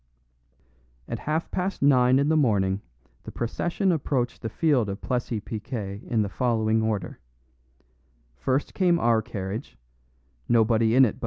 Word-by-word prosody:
At - - -4
half 155 +2 -2
past 185 -3 -2
nine 130 -2 +5
in 140 +1 +2
the 160 - +3
morning 100 -9 +2 0.4
the - - -9
procession 175 - -1
approached 135 -6 -1
the 110 - -3
field 130 -5 +1
of 100 - -4
Plessis 120 -3 -2
Piquet 105 -2 -5
in 110 -3 +1
the - - -2
following 110 -1 +1
order: 105 -5 -2 1.2
first 130 - -1
came 180 -3 +3
our 115 -7 +3
carriage 110 +1 -6 0.7
nobody 115 0 +3
in 130 0 +7
it - - +2
but - - -10
M. - - -19
120 Hz, 150 wpm, -25 LUFS, 110-140 Hz, 1.2 s, in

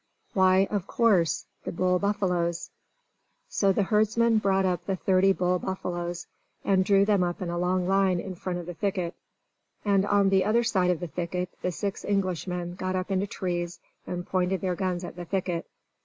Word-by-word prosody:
Why, 190 0 +4
of 200 -2 -2
course, 200 -9 +2 0.2
the - - -4
bull 180 +1 +1
buffaloes! 180 -4 -1 0.8
So 200 - +2
the 200 - +2
herdsman 220 +2 +3
brought 195 -2 +2
up 180 -2 0
the 190 +1 -1
thirty 190 +1 +3
bull 180 -1 +1
buffaloes, 175 -2 -4 0.4
and 190 -1 +3
drew 195 +1 +4
them 205 -2 +3
up 175 -1 -2
in 180 -3 -3
a 175 - -2
long 180 0 +1
line 190 -2 +3
in 190 +1 -5
front 180 0 -4
of 175 - -6
the 175 - -6
thicket. 180 0 -2 0.7
And 200 -2 +3
on 200 -1 +4
the 190 -1 +4
other 220 +4 +2
side 190 -6 +2
of 180 -2 0
the 175 - -3
thicket 180 +2 -3
the 180 - -1
six 200 +2 -4
Englishmen 180 -3 -1
got 185 +1 -3
up 185 +1 -2
into 195 +1 +1
trees, 175 -2 -3 0.3
and 175 0 -4
pointed 185 0 0
their 185 -1 0
guns 185 -1 -2
at 175 - -7
the 175 0 -7
thicket. 180 -2 -2
185 Hz, 185 wpm, -27 LUFS, 175-195 Hz, 0.8 s, Why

